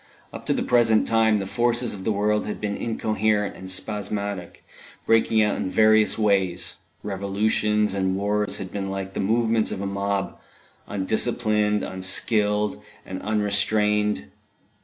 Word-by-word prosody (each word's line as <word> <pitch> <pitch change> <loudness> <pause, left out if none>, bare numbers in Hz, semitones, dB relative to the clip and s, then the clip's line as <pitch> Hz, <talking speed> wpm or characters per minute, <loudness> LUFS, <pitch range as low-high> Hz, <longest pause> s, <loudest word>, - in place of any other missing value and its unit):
Up - - -9
to - - +3
the - - -1
present 115 -3 +3
time 110 -1 +3
the 100 - -3
forces 120 +3 0
of 95 -2 -8
the 110 - +1
world 105 +1 0
had 105 - -4
been 105 -1 -2
incoherent 110 -2 -1
and 95 - -9
spasmodic, 100 -1 -4 0.4
breaking 115 -1 +3
out 105 - 0
in - - -2
various 110 +1 +4
ways 95 -5 +1 0.3
revolutions 105 +1 0
and 95 -1 0
wars 105 +1 0
had 95 -2 -7
been 95 -1 -4
like 95 0 -5
the - - -4
movements 115 +2 +1
of - - -4
a 100 - -3
mob, 100 0 -2 0.5
undisciplined, 105 +1 0
unskilled, 105 +3 0 0.2
and 95 0 -6
unrestrained. 105 -5 +1
105 Hz, 140 wpm, -24 LUFS, 100-110 Hz, 0.5 s, various